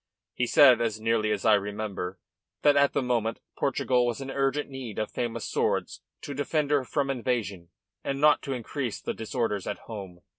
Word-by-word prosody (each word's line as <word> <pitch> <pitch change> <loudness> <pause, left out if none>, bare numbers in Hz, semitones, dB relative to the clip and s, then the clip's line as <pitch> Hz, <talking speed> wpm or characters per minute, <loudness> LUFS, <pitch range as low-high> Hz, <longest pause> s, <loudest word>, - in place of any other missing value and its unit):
He 125 - 0
said, 135 -3 +7
as 110 -2 -1
nearly 110 -1 +1
as 105 0 -1
I 110 - +6
remember, 100 -2 -2 0.5
that 145 -1 +6
at 140 0 +4
the - - +1
moment 115 -3 0 0.2
Portugal 125 -2 +1
was 120 +1 -2
in 135 0 -5
urgent 135 +2 0
need 130 -6 -7
of 110 - -2
famous 115 -2 -3
swords - - -1 0.2
to 145 - -6
defend 145 +1 -1
her 145 -2 +3
from 135 +2 -1
invasion 110 -9 -2 0.3
and 135 0 -2
not 150 +1 +5
to 135 - -3
increase 125 -1 -4
the - - -3
disorders 110 -3 -2
at 105 - -2
home." 95 -6 -8
120 Hz, 185 wpm, -27 LUFS, 110-135 Hz, 0.5 s, said